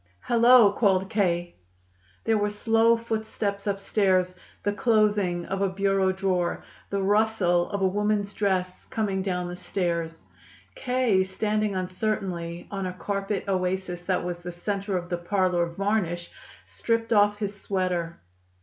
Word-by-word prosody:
"Hello!" 235 Hz, -2 st, +6 dB
called 195 Hz, -2 st, +1 dB
K. 175 Hz, -5 st, 0 dB, 0.7 s
There 225 Hz, -1 st, +2 dB
were 205 Hz, 0 st, +1 dB
slow 225 Hz, +2 st, +3 dB
footsteps 220 Hz, -3 st, -3 dB
upstairs, 195 Hz, -2 st, +1 dB, 0.3 s
the 205 Hz, -, 0 dB
closing 205 Hz, -6 st, +2 dB
of 195 Hz, 0 st, -3 dB
a 195 Hz, -, +2 dB
bureau 195 Hz, 0 st, +1 dB
drawer, 185 Hz, -2 st, -1 dB, 0.3 s
the 200 Hz, -1 st, -1 dB
rustle 200 Hz, -4 st, +2 dB
of 200 Hz, -2 st, -2 dB
a -, -, +5 dB
woman's 205 Hz, +1 st, 0 dB
dress 185 Hz, -3 st, -1 dB
coming 210 Hz, -6 st, -1 dB
down 180 Hz, -2 st, -2 dB
the 175 Hz, -, -6 dB
stairs. 170 Hz, -3 st, -3 dB, 0.5 s
K., 250 Hz, -6 st, +1 dB
standing 210 Hz, +2 st, -1 dB
uncertainly 185 Hz, -2 st, -3 dB
on 195 Hz, -2 st, -3 dB
a 180 Hz, -, -4 dB
carpet 195 Hz, +2 st, -3 dB
oasis 185 Hz, -1 st, -1 dB
that 185 Hz, -1 st, 0 dB
was 175 Hz, -1 st, -4 dB
the 175 Hz, 0 st, -7 dB
center 195 Hz, +2 st, -2 dB
of 175 Hz, -1 st, -5 dB
the 175 Hz, -, -1 dB
parlor 180 Hz, -1 st, +1 dB
varnish, 175 Hz, -1 st, -2 dB, 0.3 s
stripped 230 Hz, 0 st, -1 dB
off 205 Hz, -1 st, +4 dB
his 205 Hz, -1 st, -5 dB
sweater. 180 Hz, -3 st, -2 dB
195 Hz, 140 wpm, -26 LUFS, 180-210 Hz, 0.7 s, Hello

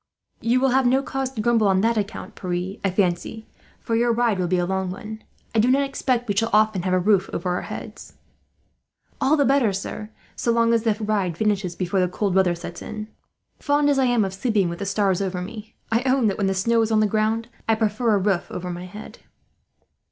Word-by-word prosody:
"You 235 Hz, +3 st, +2 dB
will 265 Hz, +1 st, +3 dB
have 260 Hz, 0 st, +3 dB
no 265 Hz, +2 st, +3 dB
cause 270 Hz, -1 st, -3 dB
to 220 Hz, -, -3 dB
grumble 230 Hz, -2 st, +3 dB
on 190 Hz, -1 st, +3 dB
that 230 Hz, +2 st, +2 dB
account, 210 Hz, -1 st, -4 dB
Pierre, 180 Hz, +1 st, -4 dB
I 195 Hz, -, +2 dB
fancy, 185 Hz, +3 st, -1 dB, 0.3 s
for 230 Hz, -, -2 dB
your 235 Hz, +1 st, +2 dB
ride 230 Hz, -4 st, +1 dB
will 180 Hz, -, 0 dB
be 180 Hz, +1 st, +1 dB
a 175 Hz, -, +1 dB
long 190 Hz, 0 st, -1 dB
one. 215 Hz, +4 st, -7 dB, 0.3 s
I 225 Hz, -, +2 dB
do 235 Hz, +4 st, +4 dB
not 275 Hz, +2 st, +4 dB
expect 255 Hz, -3 st, -1 dB
we 205 Hz, -, -1 dB
shall 225 Hz, +3 st, +1 dB
often 215 Hz, -3 st, +3 dB
have 185 Hz, +1 st, -1 dB
a -, -, +3 dB
roof 195 Hz, 0 st, +2 dB
over 180 Hz, +1 st, -2 dB
our 180 Hz, -, -1 dB
heads." -, -, -8 dB, 1.1 s
"All 285 Hz, +3 st, +3 dB
the 285 Hz, -, +3 dB
better, 270 Hz, -6 st, +3 dB
sir, 200 Hz, +2 st, -5 dB, 0.3 s
so 235 Hz, -, 0 dB
long 230 Hz, 0 st, +3 dB
as 230 Hz, -, +3 dB
the 220 Hz, -2 st, +1 dB
ride 205 Hz, -6 st, -1 dB
finishes 200 Hz, -4 st, 0 dB
before 185 Hz, +1 st, -1 dB
the 180 Hz, -, +3 dB
cold 195 Hz, +2 st, -1 dB
weather 185 Hz, -2 st, +3 dB
sets 170 Hz, -, -8 dB
in. 215 Hz, 0 st, -7 dB, 0.5 s
Fond 290 Hz, 0 st, +2 dB
as 275 Hz, -, +2 dB
I 265 Hz, -, +3 dB
am 240 Hz, -4 st, +2 dB
of 190 Hz, -, -4 dB
sleeping 200 Hz, -3 st, +1 dB
with 170 Hz, -, -6 dB
the 200 Hz, -, -3 dB
stars 195 Hz, -2 st, +1 dB
over 185 Hz, -2 st, -2 dB
me; 215 Hz, +4 st, -8 dB, 0.2 s
I 230 Hz, +1 st, +3 dB
own 260 Hz, -2 st, +3 dB
that, 195 Hz, -, -3 dB
when 200 Hz, -, +1 dB
the 195 Hz, -, 0 dB
snow 230 Hz, +5 st, +2 dB
is 225 Hz, 0 st, 0 dB
on 220 Hz, -, +4 dB
the 215 Hz, -, +4 dB
ground, 220 Hz, +2 st, 0 dB, 0.2 s
I 225 Hz, -, +5 dB
prefer 220 Hz, +1 st, +1 dB
a -, -, +3 dB
roof 195 Hz, -2 st, 0 dB
over 180 Hz, 0 st, -5 dB
my 175 Hz, +1 st, -6 dB
head." 210 Hz, +4 st, -11 dB
215 Hz, 235 wpm, -23 LUFS, 190-230 Hz, 1.1 s, I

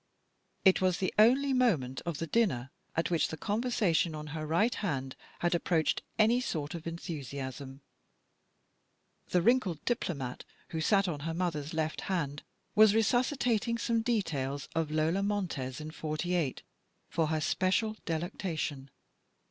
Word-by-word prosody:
It 190 Hz, -1 st, +6 dB
was 185 Hz, -2 st, +2 dB
the 185 Hz, -, -1 dB
only 265 Hz, +5 st, +5 dB
moment 165 Hz, -, +2 dB
of 170 Hz, -4 st, -2 dB
the 165 Hz, -, -2 dB
dinner 160 Hz, -, +1 dB, 0.2 s
at 165 Hz, +2 st, 0 dB
which 170 Hz, -, +2 dB
the 160 Hz, -, -6 dB
con 205 Hz, +7 st, -1 dB
versation 180 Hz, -9 st, +1 dB
on 150 Hz, 0 st, -6 dB
her 155 Hz, -1 st, -4 dB
right 205 Hz, +10 st, +2 dB
hand 135 Hz, -9 st, -3 dB, 0.3 s
had 175 Hz, +1 st, +2 dB
approached 170 Hz, -2 st, +1 dB, 0.2 s
any 225 Hz, +3 st, +4 dB
sort 150 Hz, -10 st, -3 dB
of 170 Hz, -1 st, -6 dB
enthusiasm. 140 Hz, -4 st, -6 dB, 1.5 s
The 180 Hz, -1 st, +2 dB
wrinkled 215 Hz, -, +2 dB
diplomat, 145 Hz, -, -2 dB, 0.3 s
who 160 Hz, -, -3 dB
sat 195 Hz, +3 st, +3 dB
on 155 Hz, -5 st, -2 dB
her 165 Hz, +3 st, -3 dB
mother's 165 Hz, -4 st, -2 dB
left 155 Hz, -1 st, -1 dB
hand, 145 Hz, -7 st, -2 dB, 0.3 s
was 215 Hz, -1 st, +6 dB
resuscitating 235 Hz, 0 st, +2 dB
some 230 Hz, 0 st, +1 dB
details 145 Hz, -, -1 dB
of 165 Hz, -2 st, 0 dB
Lola 155 Hz, +5 st, +1 dB
Montez 175 Hz, -10 st, -2 dB
in 155 Hz, 0 st, -6 dB
'48 155 Hz, -1 st, -2 dB, 0.4 s
for 160 Hz, -2 st, 0 dB
her 155 Hz, 0 st, 0 dB
special 190 Hz, +7 st, +1 dB
delectation. 160 Hz, -4 st, -3 dB
170 Hz, 140 wpm, -31 LUFS, 150-210 Hz, 1.5 s, It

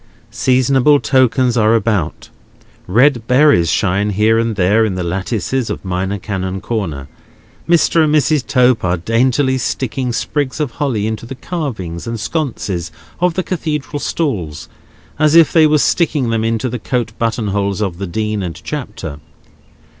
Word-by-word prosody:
Seasonable 130 Hz, +3 st, +3 dB
tokens 130 Hz, -2 st, +2 dB
are 110 Hz, -1 st, +3 dB
about. 105 Hz, -8 st, -1 dB, 0.6 s
Red 120 Hz, +3 st, +3 dB
berries 130 Hz, -, +4 dB
shine 100 Hz, +3 st, +1 dB
here 110 Hz, +3 st, +2 dB
and 115 Hz, -1 st, -1 dB
there 100 Hz, +4 st, +3 dB
in 105 Hz, -4 st, -1 dB
the 90 Hz, -, -2 dB
lattices 100 Hz, +7 st, -2 dB
of -, -, -5 dB
Minor 95 Hz, +2 st, -2 dB
Canon 95 Hz, -1 st, -4 dB
Corner; 95 Hz, -, -4 dB, 0.6 s
Mr. 170 Hz, -1 st, +4 dB
and 150 Hz, 0 st, +1 dB
Mrs. 150 Hz, -1 st, +2 dB
Tope 125 Hz, -1 st, +3 dB
are 90 Hz, 0 st, +1 dB
daintily 130 Hz, -, +1 dB
sticking 130 Hz, +1 st, -2 dB
sprigs 140 Hz, +4 st, -2 dB
of 150 Hz, -5 st, -1 dB
holly 125 Hz, -9 st, -1 dB
into 110 Hz, +1 st, -4 dB
the 135 Hz, -, -7 dB
carvings 120 Hz, -, -5 dB
and 115 Hz, -1 st, -4 dB
sconces 105 Hz, -, -3 dB, 0.3 s
of 180 Hz, -1 st, +1 dB
the 185 Hz, -, 0 dB
Cathedral 150 Hz, -6 st, -3 dB
stalls, 100 Hz, -, -3 dB, 0.5 s
as 155 Hz, 0 st, +3 dB
if 165 Hz, -2 st, +6 dB
they 160 Hz, -2 st, +6 dB
were 150 Hz, 0 st, +3 dB
sticking 145 Hz, -5 st, +1 dB
them 115 Hz, -1 st, 0 dB
into 115 Hz, +2 st, 0 dB
the 125 Hz, 0 st, -4 dB
coat 120 Hz, -1 st, -2 dB
button 115 Hz, -2 st, -1 dB
holes 100 Hz, 0 st, -1 dB
of 95 Hz, -5 st, -3 dB
the 100 Hz, -, -3 dB
Dean 105 Hz, +3 st, -2 dB
and 85 Hz, -3 st, -5 dB
Chapter. 105 Hz, -, -6 dB
115 Hz, 155 wpm, -16 LUFS, 100-135 Hz, 0.6 s, if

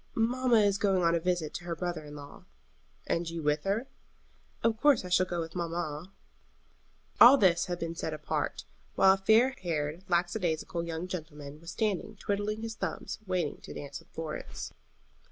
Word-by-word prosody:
"Mamma 240 Hz, 0 st, +3 dB
is 200 Hz, -1 st, +2 dB
going 195 Hz, -3 st, +2 dB
on 170 Hz, 0 st, +4 dB
a 170 Hz, -, +2 dB
visit 175 Hz, -3 st, -1 dB
to 175 Hz, -, -5 dB
her 170 Hz, -1 st, -2 dB
brother 175 Hz, -2 st, -3 dB
in 150 Hz, 0 st, -10 dB
law." 145 Hz, -1 st, -11 dB, 0.6 s
"And 170 Hz, 0 st, -1 dB
you 165 Hz, -1 st, -5 dB
with 150 Hz, +2 st, +1 dB
her?" 205 Hz, +6 st, 0 dB, 0.8 s
"Of 230 Hz, -1 st, +2 dB
course 290 Hz, -9 st, +5 dB
I -, -, -6 dB
shall 180 Hz, +1 st, +3 dB
go 175 Hz, -1 st, -2 dB
with 165 Hz, 0 st, -6 dB
mamma." 170 Hz, -1 st, -3 dB, 1.1 s
All 250 Hz, +4 st, +10 dB
this 175 Hz, -5 st, +3 dB
had 175 Hz, -1 st, -2 dB
been 165 Hz, -1 st, -3 dB
said 165 Hz, -1 st, -3 dB
apart, 155 Hz, -1 st, -3 dB, 0.3 s
while 190 Hz, 0 st, +7 dB
a -, -, 0 dB
fair 220 Hz, +6 st, +5 dB
haired, 160 Hz, -1 st, -2 dB
lackadaisical 175 Hz, -1 st, 0 dB
young 165 Hz, +1 st, -4 dB
gentleman 150 Hz, -4 st, -7 dB
was 170 Hz, -, -9 dB
standing 210 Hz, +1 st, -1 dB
twiddling 205 Hz, +2 st, -2 dB
his 225 Hz, 0 st, -4 dB
thumbs 190 Hz, -7 st, -4 dB
waiting 180 Hz, -5 st, -1 dB
to -, -, -9 dB
dance 140 Hz, -1 st, -6 dB
with -, -, -21 dB
Florence. 160 Hz, -2 st, -6 dB
175 Hz, 175 wpm, -30 LUFS, 160-200 Hz, 1.1 s, All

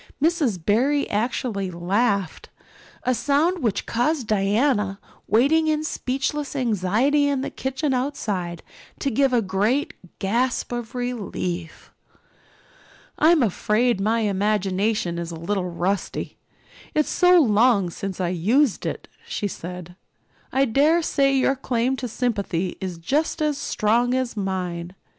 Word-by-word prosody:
Miss 300 Hz, -, +1 dB
Barry 245 Hz, -, +1 dB
actually 210 Hz, -2 st, -1 dB
laughed 195 Hz, +2 st, -1 dB, 0.5 s
a 255 Hz, -, +2 dB
sound 300 Hz, +8 st, +1 dB
which 220 Hz, -5 st, 0 dB
caused 255 Hz, +3 st, 0 dB
Diana, 205 Hz, 0 st, +1 dB, 0.3 s
waiting 285 Hz, +9 st, +3 dB
in 310 Hz, 0 st, +1 dB
speechless 280 Hz, 0 st, -2 dB
anxiety 245 Hz, +5 st, +2 dB
in 280 Hz, -2 st, 0 dB
the -, -, -4 dB
kitchen 265 Hz, +2 st, -2 dB
outside, 205 Hz, -, -2 dB, 0.3 s
to 275 Hz, -, -1 dB
give 270 Hz, +3 st, +2 dB
a 240 Hz, -2 st, +2 dB
great 205 Hz, +9 st, 0 dB, 0.2 s
gasp 240 Hz, +7 st, 0 dB
of 240 Hz, 0 st, -5 dB
relief. 195 Hz, -9 st, -4 dB, 1.3 s
"I'm 315 Hz, -2 st, +5 dB
afraid 215 Hz, +1 st, +1 dB
my 225 Hz, +3 st, +1 dB
imagination 200 Hz, -2 st, 0 dB
is 170 Hz, -1 st, -4 dB
a 170 Hz, -, -6 dB
little 180 Hz, +3 st, -2 dB
rusty 180 Hz, +3 st, -3 dB, 0.6 s
it's 305 Hz, -, +2 dB
so 360 Hz, 0 st, +5 dB
long 215 Hz, -, +3 dB
since 195 Hz, +1 st, -5 dB
I 180 Hz, -2 st, 0 dB
used 215 Hz, -, +1 dB
it," -, -, -5 dB, 0.2 s
she 205 Hz, -, -2 dB
said. 180 Hz, -1 st, -8 dB, 0.6 s
"I 270 Hz, +1 st, +3 dB
dare 295 Hz, +8 st, +3 dB
say 275 Hz, -3 st, +2 dB
your 270 Hz, +1 st, +2 dB
claim 255 Hz, 0 st, 0 dB
to 255 Hz, -, -4 dB
sympathy 200 Hz, -7 st, -2 dB
is 185 Hz, -3 st, -4 dB
just 290 Hz, -, -1 dB
as 300 Hz, -1 st, +1 dB
strong 240 Hz, +3 st, +1 dB
as 255 Hz, -3 st, -1 dB
mine. 180 Hz, -3 st, -3 dB
230 Hz, 130 wpm, -23 LUFS, 195-270 Hz, 1.3 s, I'm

